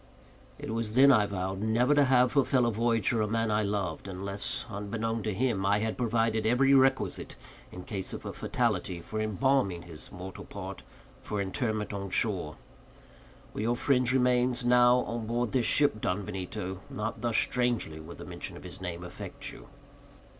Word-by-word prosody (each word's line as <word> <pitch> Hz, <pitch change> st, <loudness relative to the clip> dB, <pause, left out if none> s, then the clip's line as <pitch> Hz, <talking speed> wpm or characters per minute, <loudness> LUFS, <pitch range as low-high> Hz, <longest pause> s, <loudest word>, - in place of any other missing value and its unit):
It -, -, -6 dB
was 115 Hz, -1 st, -2 dB
then 140 Hz, +2 st, +8 dB
I 105 Hz, -6 st, +4 dB
vowed 95 Hz, 0 st, -3 dB
never 115 Hz, +6 st, +3 dB
to 145 Hz, -1 st, +5 dB
have 125 Hz, -1 st, +4 dB
for 140 Hz, -1 st, +4 dB
fellow 125 Hz, -3 st, +2 dB
voyager 115 Hz, 0 st, +1 dB
a 105 Hz, -, +1 dB
man 115 Hz, 0 st, 0 dB
I 105 Hz, 0 st, +2 dB
loved, 100 Hz, -4 st, -2 dB
unless, 100 Hz, +1 st, -3 dB
unbeknown 110 Hz, +2 st, -3 dB
to 110 Hz, -, -2 dB
him, 110 Hz, -1 st, 0 dB
I 100 Hz, +1 st, +3 dB
had 110 Hz, +1 st, -1 dB
provided 115 Hz, -2 st, +1 dB
every 125 Hz, +5 st, +4 dB
requisite, 135 Hz, 0 st, +2 dB, 0.4 s
in 90 Hz, -, -8 dB
case 95 Hz, -2 st, -4 dB
of -, -, -7 dB
a -, -, -5 dB
fatality, 90 Hz, -, -1 dB
for 110 Hz, +6 st, -4 dB
embalming 110 Hz, -4 st, +1 dB
his 80 Hz, -3 st, -6 dB
mortal 90 Hz, +1 st, -8 dB
part -, -, -7 dB, 0.4 s
for 105 Hz, -, -4 dB
interment 105 Hz, +2 st, -2 dB
on 100 Hz, -1 st, -4 dB
shore. 90 Hz, -6 st, 0 dB, 1.0 s
Were -, -, -4 dB
your 120 Hz, +2 st, +1 dB
friend's 125 Hz, -1 st, +2 dB
remains 125 Hz, -1 st, +2 dB
now 125 Hz, 0 st, +5 dB
on 115 Hz, -2 st, -4 dB
board 120 Hz, -1 st, -1 dB
this 125 Hz, -3 st, +1 dB
ship, 145 Hz, -7 st, +3 dB
Don 95 Hz, +2 st, -1 dB
Benito, 95 Hz, -1 st, -5 dB
not 110 Hz, +2 st, -4 dB
thus 115 Hz, -2 st, +1 dB
strangely 120 Hz, -11 st, +1 dB
would 80 Hz, +2 st, -10 dB
the -, -, -9 dB
mention -, -, -6 dB
of -, -, -12 dB
his 90 Hz, +1 st, -7 dB
name 90 Hz, -1 st, -5 dB
affect 90 Hz, -, -7 dB
you." -, -, -13 dB
110 Hz, 175 wpm, -29 LUFS, 95-120 Hz, 1.0 s, then